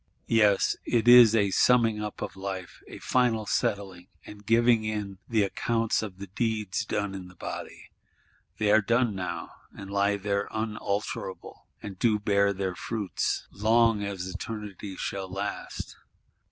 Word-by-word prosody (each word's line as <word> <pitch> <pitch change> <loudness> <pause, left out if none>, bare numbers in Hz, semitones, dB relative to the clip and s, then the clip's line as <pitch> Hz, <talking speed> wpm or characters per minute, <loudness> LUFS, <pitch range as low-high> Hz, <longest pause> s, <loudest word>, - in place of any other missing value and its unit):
Yes, 105 -3 +4
it 120 0 0
is 120 -2 +9
a 100 -3 +2
summing 115 -1 +3
up 105 -1 -5
of - - -6
Life; 95 -2 -6
a - - -9
final 120 -4 +1
settling, 95 -3 -2 0.2
and 105 0 -11
giving 115 +1 +4
in 105 -3 -4
the 110 -3 +3
"account 115 +3 0
of 100 -4 -7
the 100 - -7
deeds 110 0 -2
done 105 -1 -2
in 95 -2 -7
the 90 - -16
body:" - - -8 0.7
they 105 -1 +2
are 110 +1 +6
done 115 +1 +1
now; 90 -3 -5 0.3
and 95 0 -8
lie 100 0 +2
there 100 0 -1
unalterable, 105 -3 -4 0.2
and 95 -3 -8
do 110 -3 +3
bear 100 -1 +2
their 95 -1 -2
fruits, 105 +2 -3
long 110 0 +3
as 100 -3 -4
Eternity 100 0 -6
shall 95 0 -4
last. 95 +2 -5
105 Hz, 150 wpm, -27 LUFS, 95-110 Hz, 0.7 s, is